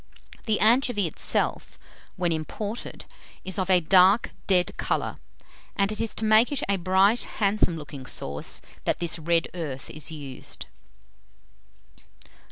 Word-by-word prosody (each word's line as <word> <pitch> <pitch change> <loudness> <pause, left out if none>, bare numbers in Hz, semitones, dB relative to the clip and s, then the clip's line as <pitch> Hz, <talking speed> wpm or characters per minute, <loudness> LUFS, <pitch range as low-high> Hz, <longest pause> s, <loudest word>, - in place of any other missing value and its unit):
The 215 -1 +2
anchovy 230 -2 +3
itself, 165 - -1 0.4
when 175 -2 0
imported, 200 +8 -5 0.4
is 190 +2 -2
of 185 0 -1
a 185 -1 +6
dark 185 +5 +5 0.2
dead 180 -2 +2
colour, - - -1 0.6
and 200 +1 +1
it 215 - -3
is 230 - -3
to 220 - -2
make 220 +4 +5
it 285 - -1
a 200 0 +1
bright 190 +5 +3
"handsome 200 -5 +2
looking 140 -3 -9
sauce" 70 +1 -2 0.2
that - - +1
this 170 -1 0
red 165 +1 +1
earth 150 -7 -5
is 155 -2 -4
used. 145 -5 -6
185 Hz, 135 wpm, -26 LUFS, 160-215 Hz, 0.6 s, a